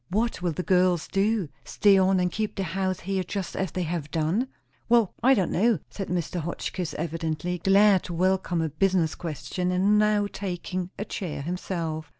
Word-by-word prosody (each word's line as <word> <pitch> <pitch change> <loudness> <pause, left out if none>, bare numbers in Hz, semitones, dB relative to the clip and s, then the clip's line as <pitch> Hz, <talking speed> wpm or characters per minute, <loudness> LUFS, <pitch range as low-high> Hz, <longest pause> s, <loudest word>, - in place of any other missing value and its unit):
"What 220 0 0
will 175 -1 0
the 180 - -3
girls 180 -2 +2
do? 200 -3 +1
Stay 200 -1 +4
on 190 0 +4
and 180 -1 +1
keep 215 +2 -2
the 195 - -2
house 185 +1 -2
here 190 0 -1
just 190 0 -4
as 190 -3 -2
they 185 - -1
have 165 -3 -3
done?" 165 - 0 0.4
"Well, 230 -4 +4
I 265 +2 +6
don' 190 -5 0
know," 225 +4 +3
said 195 - -5
Mr. 175 0 -2
Hotchkiss, 170 +1 -4
evidently 165 +2 -3
glad 195 +1 +5
to 175 - -5
welcome 185 -1 +1
a 160 - -1
business 170 +1 +1
question, 180 +2 -3
and 195 +3 +3
now 210 -1 +3
taking 185 -2 -4
a 205 - -3
chair 165 -9 -5
himself. 165 -2 -3
185 Hz, 180 wpm, -26 LUFS, 170-195 Hz, 0.4 s, I